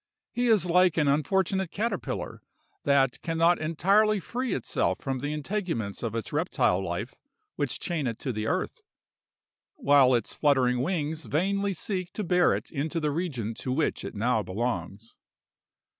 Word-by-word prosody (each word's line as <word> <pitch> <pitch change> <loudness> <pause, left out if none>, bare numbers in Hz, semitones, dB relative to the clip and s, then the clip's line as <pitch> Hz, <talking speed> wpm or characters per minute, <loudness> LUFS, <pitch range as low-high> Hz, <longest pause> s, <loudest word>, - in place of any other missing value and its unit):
He 245 +1 0
is 215 -6 +4
like 180 -1 +4
an 150 -2 +3
unfortunate 190 +6 +1
caterpillar 225 +6 -3 0.4
that 135 -3 +3
'can 165 -1 -3
not 170 +2 +4
entirely 200 +7 +3
free 245 +8 -3
itself - - -1
from 135 -3 -3
the 145 +3 -3
integuments 150 - -3
of 115 -2 -3
its 115 - -4
reptile 90 +2 +1
life 95 +7 -4 0.4
which - - -2
chain 165 -7 -2
it 115 -2 -3
to 130 - -3
the 110 0 -3
earth, - - -2 0.9
while 140 -3 +5
its 120 - -2
fluttering 130 -4 +2
wings 155 0 -2
vainly 195 +5 0
seek 185 0 -3
to 210 - -3
bear 180 -1 +3
it - - -6
into 160 +2 -2
the 150 -2 0
region 140 - -3
to 125 - -5
which 150 +4 0
it - - -6
now 110 +2 +1
belongs. 100 0 -4
150 Hz, 160 wpm, -27 LUFS, 125-180 Hz, 0.9 s, while